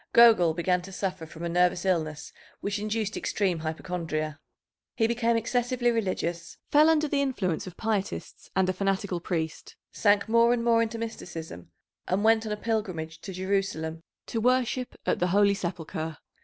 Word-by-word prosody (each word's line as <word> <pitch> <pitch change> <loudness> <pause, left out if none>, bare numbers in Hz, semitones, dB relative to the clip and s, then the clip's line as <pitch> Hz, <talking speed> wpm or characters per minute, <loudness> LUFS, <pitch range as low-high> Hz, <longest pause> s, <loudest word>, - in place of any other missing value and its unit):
Gogol 215 -9 +7
began 180 +1 +1
to 190 +2 -10
suffer 185 -3 -3
from 165 +1 -10
a - - -1
nervous 175 +1 +2
illness 155 -5 -1 0.3
which 205 0 -2
induced 215 0 -2
extreme 185 -5 0
hypochondria. 155 -1 -3 0.6
He 225 - +2
became 235 0 +2
excessively 245 +1 +1
religious, 185 -6 -2
fell 305 +2 +6
under 310 -1 +3
the 285 -1 +1
influence 195 - -1
of 180 - -9
pietists 215 -2 -3
and 190 -1 +3
a 185 - +1
fanatical 195 -1 -1
priest, 160 -2 -4 0.2
sank 205 0 +3
more 230 +1 +5
and 235 -1 -1
more 230 -1 +4
into 230 0 -1
mysticism, 165 - -7 0.4
and 190 +3 +1
went 225 0 +4
on - - -3
a 210 - -1
pilgrimage 185 -8 -3
to 195 - -7
Jerusalem 185 -4 -2 0.2
to 225 - -2
worship 250 +1 +1
at - - +1
the 180 - +2
Holy 200 +2 +4
Sepulchre. 165 -4 -4
195 Hz, 165 wpm, -27 LUFS, 170-225 Hz, 0.6 s, Gogol